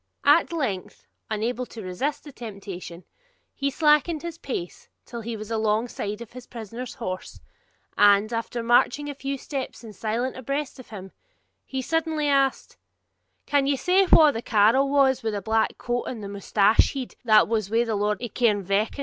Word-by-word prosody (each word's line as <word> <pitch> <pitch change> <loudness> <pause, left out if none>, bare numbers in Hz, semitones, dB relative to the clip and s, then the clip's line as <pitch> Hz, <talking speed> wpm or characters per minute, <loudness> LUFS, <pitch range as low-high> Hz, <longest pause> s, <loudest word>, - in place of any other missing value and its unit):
At - - +5
length, 255 - -3 0.2
unable 235 +4 -2
to 225 - -9
resist 275 +11 -3
the 290 - -10
temptation, 195 -7 -8 0.5
he 280 0 -1
slackened 300 +2 +2
his 335 -1 -6
pace 180 -10 -6 0.2
till 235 -1 -7
he 225 0 -5
was 215 +1 -8
alongside 220 -1 -1
of 235 - -9
his 250 -1 -10
prisoner's 235 +2 -7
horse, 185 -7 -6 0.6
and 205 +2 +5
after 230 +1 -3
marching 245 +5 +2
a - - -6
few 275 0 -4
steps 265 -2 -6
in 220 -2 -10
silence 230 +5 -2
abreast 275 +2 -4
of 255 - -12
him, 195 -3 -9 0.6
he 265 -1 -3
suddenly 320 0 0
asked 275 -2 +1 0.7
'Can 285 -1 +2
ye 280 - +2
say 365 +7 +3
wha 310 -2 +8
the 225 - -4
carle 230 +6 +3
was 275 -2 +3
wi' 225 - -1
the 205 -1 -2
black 220 +3 0
coat 245 0 -2
and 225 -4 -6
the - - -5
mousted 200 +1 +2 0.2
head, 260 -3 -5
that 215 -3 +5
was 215 -3 -1
wi' 230 +2 +2
the 225 -2 -2
Laird 210 +3 -1
of 240 - -5
Cairnvreckan?' 205 0 +1
235 Hz, 175 wpm, -25 LUFS, 215-275 Hz, 0.7 s, wha